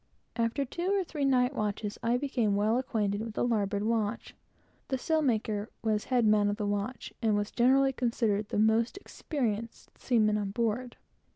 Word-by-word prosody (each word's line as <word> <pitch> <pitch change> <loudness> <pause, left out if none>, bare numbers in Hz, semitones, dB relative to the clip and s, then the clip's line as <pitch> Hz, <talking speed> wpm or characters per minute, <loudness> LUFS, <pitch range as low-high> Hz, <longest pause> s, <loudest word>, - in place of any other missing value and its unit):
After 235 +4 0
two 345 +7 -4
or 390 - +1
three 305 -4 -3
night 255 -1 +3
watches, 210 -3 -3
I 235 +1 +2
became 245 -6 0
quite - - +1
well 215 +3 +2
acquainted 210 -5 -1
with 225 -1 -6
all - - +2
the 240 - +1
larboard 205 -1 0
watch. 220 0 -1 0.5
The 265 - -1
sailmaker 230 -9 0 0.2
was 215 -2 0
the - - -19
head 250 -3 +3
man 210 -1 +4
of 205 - -2
the 210 - -2
watch, 205 +5 -3
and 220 -3 +2
was 205 0 -1
generally 270 +2 +3
considered 225 -5 0
the - - -2
most 220 - +2
experienced 230 - -4
seaman 215 -4 +2
on 200 -1 -2
board. 235 +3 -2
225 Hz, 185 wpm, -30 LUFS, 210-250 Hz, 0.5 s, man